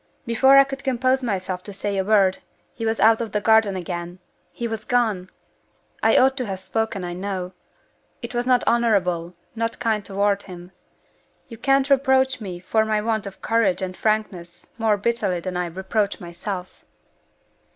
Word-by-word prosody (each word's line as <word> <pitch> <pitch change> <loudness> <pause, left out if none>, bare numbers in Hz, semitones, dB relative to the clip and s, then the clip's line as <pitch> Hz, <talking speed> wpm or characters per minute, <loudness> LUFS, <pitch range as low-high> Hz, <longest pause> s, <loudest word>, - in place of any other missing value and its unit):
Before 265 +4 +5
I 275 - +9
could 275 0 -7
compose 260 0 +1
myself 190 -6 -3
to 205 - -9
say 200 +1 -3
a 190 - +1
word, 195 -2 +3 0.3
he 225 - -4
was 225 0 -1
out 225 +1 +5
in 230 - -3
the 210 - -1
garden 220 -2 +3
again 175 -1 -5 0.3
he 235 - -4
was 225 -1 -5
gone! 215 -7 0 0.7
I - - +4
ought 265 +1 +4
to 255 - -1
have 190 -1 -4
spoken, 195 +1 -2
I 175 0 -4
know. 185 0 -4 0.7
It - - -6
was 240 +1 -1
not 250 -1 +3
honorable, 180 -7 +1 0.2
not 230 0 -2
kind 220 -2 0
toward 200 0 0
him. 180 -2 -11 0.8
You 230 -2 -10
can't 270 +1 +2
reproach 265 -2 +3
me 185 -4 -6
for 205 +5 +1
my 215 -1 0
want 220 -1 -1
of 195 - -11
courage 200 -5 +1
and 185 0 -4
frankness 205 -6 -2
more 220 -2 +2
bitterly 205 -4 -1
than 180 +1 -5
I 180 0 -1
reproach 190 +5 -2
myself!" 180 +1 -7
210 Hz, 170 wpm, -23 LUFS, 185-230 Hz, 0.8 s, I